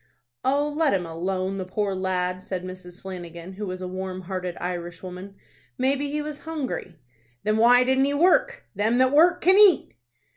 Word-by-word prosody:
"Oh, 285 +2 +2
let 295 -5 +1
him 180 -2 -2
alone, 185 +3 -3
the - - -2
poor 195 +2 -2
lad," 185 -1 -1
said 185 -1 -5
Mrs. 185 -1 -10
Flanagan, 175 -1 -8
who 205 +2 -5
was 185 0 -5
a - - -3
warm 185 0 -5
hearted 180 -1 -4
Irish 175 0 -5
woman. 185 +2 -8 0.4
"Maybe 275 +2 0
he 300 +1 -2
was 300 -1 -6
hungry." 285 - -5 0.5
"Then 215 +1 +1
why 245 +2 +6
didn't 265 +1 +2
he 285 +1 0
work? 485 +10 +3
Them 220 +4 +1
that 260 0 +4
work 345 +5 +5
can 375 +4 +5
eat." 390 - +5
195 Hz, 180 wpm, -25 LUFS, 185-280 Hz, 0.5 s, why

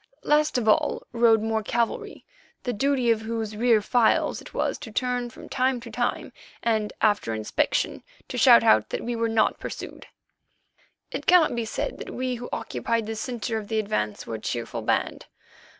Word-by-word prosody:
Last 300 -2 +2
of 230 -3 -1
all 215 - +2
rode 230 -2 +4
more 220 0 0
cavalry, 235 +2 -2 0.4
the 245 - -2
duty 255 +1 +2
of 220 -1 +1
whose 220 -1 -4
rear 225 -1 +3
files 240 0 +2
it - - -12
was - - -1
to - - -8
turn 245 +1 -1
from - - -12
time 255 -1 0
to 230 -1 -10
time, 240 +2 -2 0.3
and, 220 -2 +1
after 205 - +2
inspection, 110 -1 -1 0.3
to - - -6
shout 115 - +7
out 110 0 +4
that - - -4
we 240 0 -2
were 230 0 0
not 225 -1 +2
pursued. - - -7 1.0
It - - -5
cannot 350 -6 +6
be 235 -1 -2
said - - -4
that - - -7
we 255 0 -2
who 245 0 -6
occupied 230 -1 -2
the 225 +1 -4
centre 230 -1 -3
of 210 - -9
the 220 - -1
advance 200 - -2
were - - -6
a 110 - -4
cheerful 115 +1 -4
band. 110 - -1
225 Hz, 180 wpm, -25 LUFS, 215-245 Hz, 1.0 s, shout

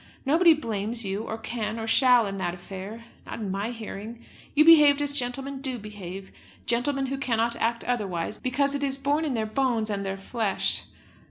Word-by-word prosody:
Nobody 325 +4 +5
blames 225 -4 -2
you, 195 +2 -2
or 220 - -4
can, 225 -1 -4
or 225 - -3
shall, 245 0 +5
in 195 -1 -4
that 175 -2 -2
affair, 195 +5 -8 0.2
not - - -7
in 205 -4 -3
my 200 +3 -2
hearing. 225 0 -8 0.3
You 305 +1 +6
behaved 300 -3 +7
as 290 -1 +1
gentlemen 270 +1 -3
do 260 -3 -2
behave; 195 -3 -8 0.3
gentlemen 270 +4 +1
who 270 +1 -3
cannot 235 -2 +1
act 230 +1 -1
otherwise, 205 -6 -2
because 275 +2 +1
it 285 0 -2
is 270 -1 +1
born 285 +3 0
in 275 -5 -1
their 220 -1 -1
bones 225 -1 0
and 200 -1 -2
their 195 0 -3
flesh. 205 +1 -1
235 Hz, 185 wpm, -26 LUFS, 210-270 Hz, 0.3 s, behaved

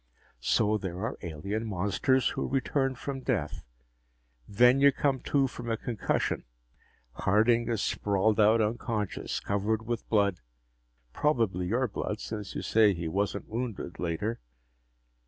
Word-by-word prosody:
So 105 - +2
there 95 -3 -5
are 115 - -3
alien 100 +7 -4
monsters 105 +7 +1
who - - -3
return 135 0 0
from 135 +1 -5
death. 90 - -2 0.9
Then 125 +6 +5
you 140 0 +7
come 135 0 0
to 140 +1 +1
from 120 -2 -6
a 115 - 0
concussion. 115 - -1 0.7
Harding 115 - +2
is 115 -4 0
sprawled 105 +2 +1
out 110 +2 +5
unconscious, 110 -2 -2
covered 105 +2 -1
with 120 0 -4
blood 100 -4 +2 0.7
probably 110 - +1
your 125 +6 +1
blood, 105 0 -4
since 105 -3 -6
you - - -3
say 110 -3 +4
he 85 -1 -4
wasn't 100 +4 -2
wounded, 115 -6 -5
later. 90 +7 -2
110 Hz, 135 wpm, -29 LUFS, 100-120 Hz, 0.9 s, you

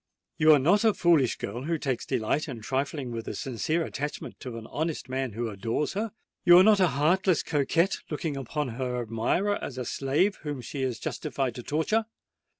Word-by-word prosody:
"You 155 0 +7
are - - +7
not 175 - +3
a 220 -2 +4
foolish 165 -8 +3
girl 120 +6 -5
who 165 +1 0
takes 135 -5 -2
delight 120 +8 0
in 125 -6 -6
trifling 135 +2 -2
with 115 -1 -5
the - - -5
sincere 145 - -1
attachment 145 +1 -5
of 120 - -5
an 115 -1 -7
honest 155 0 -3
man 130 -3 -2
who 115 +2 -2
adores 115 +7 -2
her:—you 200 -4 +2
are 185 - +8
not 210 0 +5
a 185 - +5
heartless 175 +3 +3
coquette, 165 +6 +1
looking 150 -1 -3
upon 140 +1 -3
her 125 +1 -3
admirer 120 - 0
as 130 - -5
a 125 - -3
slave 145 - +1
whom 145 -3 -5
she 135 +3 -6
is 130 -3 -1
justified 135 -3 -3
to 125 - -7
torture. 160 - 0
145 Hz, 190 wpm, -27 LUFS, 125-170 Hz, -, are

